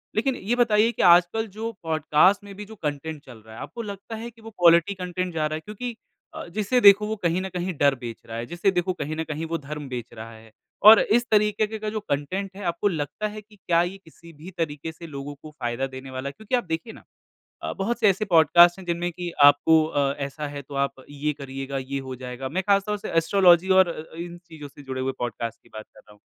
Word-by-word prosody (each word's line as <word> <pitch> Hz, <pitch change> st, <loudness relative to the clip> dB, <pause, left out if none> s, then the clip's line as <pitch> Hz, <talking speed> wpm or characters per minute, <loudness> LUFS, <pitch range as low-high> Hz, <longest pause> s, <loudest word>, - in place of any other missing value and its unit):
लेकिन 255 Hz, +4 st, +1 dB
ये 230 Hz, +3 st, -1 dB
बताइए 230 Hz, -2 st, +3 dB
कि -, -, -4 dB
आजकल 175 Hz, +6 st, +4 dB
जो 225 Hz, +1 st, -3 dB
पॉडकास्ट 160 Hz, +5 st, +3 dB
में 200 Hz, -, -10 dB
भी 210 Hz, -, -8 dB
जो 220 Hz, +2 st, -12 dB
कंटेंट 150 Hz, -2 st, -4 dB
चल 125 Hz, -3 st, -12 dB
रहा 110 Hz, 0 st, -15 dB
है, -, -, -10 dB
आपको 235 Hz, -, -7 dB
लगता 205 Hz, +1 st, -7 dB
है 230 Hz, +2 st, -6 dB
कि 230 Hz, -, -21 dB
वो 225 Hz, -, -10 dB
क्वालिटी 170 Hz, +2 st, +5 dB
कंटेंट 180 Hz, -1 st, -4 dB
जा 155 Hz, -1 st, 0 dB
रहा 155 Hz, -, -4 dB
है? 155 Hz, -, -5 dB
क्योंकि 230 Hz, +3 st, -6 dB, 0.4 s
अ, -, -, -6 dB
जिसे 215 Hz, +4 st, +1 dB
देखो 205 Hz, +1 st, +7 dB
वो 220 Hz, -, -2 dB
कहीं 175 Hz, -3 st, 0 dB
न 190 Hz, -, -4 dB
कहीं 180 Hz, +1 st, -3 dB
डर 140 Hz, -1 st, +3 dB
बेच 120 Hz, -3 st, -7 dB
रहा 115 Hz, 0 st, -7 dB
है, 115 Hz, -, -4 dB
जिसे 175 Hz, +6 st, 0 dB
देखो 180 Hz, 0 st, 0 dB
कहीं 155 Hz, -2 st, -4 dB
न 160 Hz, -, -2 dB
कहीं 155 Hz, 0 st, -5 dB
वो -, -, +1 dB
धर्म 150 Hz, -1 st, -7 dB
बेच 120 Hz, -2 st, -6 dB
रहा 115 Hz, 0 st, -9 dB
है 110 Hz, 0 st, -16 dB, 0.4 s
और 220 Hz, 0 st, +11 dB
इस 240 Hz, +3 st, +2 dB
तरीके 210 Hz, 0 st, +3 dB
के 220 Hz, -, -6 dB
का 215 Hz, 0 st, -3 dB
जो 215 Hz, 0 st, -3 dB
कंटेंट 185 Hz, +4 st, -3 dB
है, 205 Hz, -, -8 dB
आपको 170 Hz, +3 st, 0 dB
लगता 155 Hz, +3 st, -2 dB
है 210 Hz, 0 st, -8 dB
कि 210 Hz, 0 st, -21 dB
क्या 170 Hz, -3 st, +1 dB
ये 180 Hz, +2 st, -5 dB
किसी 170 Hz, -2 st, -17 dB
भी 160 Hz, +5 st, -11 dB
तरीके 160 Hz, -1 st, -3 dB
से 165 Hz, +1 st, -11 dB
लोगों 140 Hz, -1 st, -7 dB
को 155 Hz, -, -11 dB
फ़ायदा 130 Hz, -1 st, -3 dB
देने 130 Hz, 0 st, -9 dB
वाला 130 Hz, +1 st, -4 dB
है? -, -, -10 dB
क्योंकि 220 Hz, +3 st, -2 dB
आप 245 Hz, -, 0 dB
देखिए 165 Hz, +7 st, -4 dB
ना -, -, -15 dB, 0.6 s
अ, -, -, -3 dB
बहुत 230 Hz, +5 st, -1 dB
से 215 Hz, -, +5 dB
ऐसे 195 Hz, +2 st, +1 dB
पॉडकास्ट 170 Hz, 0 st, +6 dB
हैं, 190 Hz, -, -10 dB
जिनमें 175 Hz, +1 st, -1 dB
कि 175 Hz, 0 st, -5 dB
आपको 155 Hz, +2 st, +6 dB
अ, 140 Hz, -3 st, 0 dB
ऐसा 150 Hz, +2 st, -5 dB
है, 145 Hz, 0 st, -7 dB
तो 140 Hz, +1 st, -12 dB
आप 140 Hz, -1 st, -2 dB
ये 145 Hz, +1 st, -2 dB
करिएगा, 135 Hz, 0 st, -5 dB
ये 135 Hz, +1 st, -4 dB
हो 130 Hz, -, -4 dB
जाएगा। 125 Hz, +1 st, -5 dB
मैं 185 Hz, +7 st, -2 dB
ख़ासतौर 200 Hz, +1 st, +2 dB
से 210 Hz, -, -7 dB
एस्ट्रोलॉजी 175 Hz, +1 st, +4 dB
और 185 Hz, -, +4 dB
अ-अ, 160 Hz, -1 st, -8 dB
इन 175 Hz, 0 st, -6 dB
चीज़ों 150 Hz, -3 st, -10 dB
से 145 Hz, -, -15 dB
जुड़े 130 Hz, -1 st, -5 dB
हुए 130 Hz, +1 st, -1 dB
पॉडकास्ट 115 Hz, -1 st, -4 dB
की -, -, -23 dB
बात 110 Hz, -, -7 dB
कर -, -, -16 dB
रहा 105 Hz, -, -20 dB
हूँ। 105 Hz, -, -22 dB
170 Hz, 250 wpm, -24 LUFS, 140-200 Hz, 0.6 s, और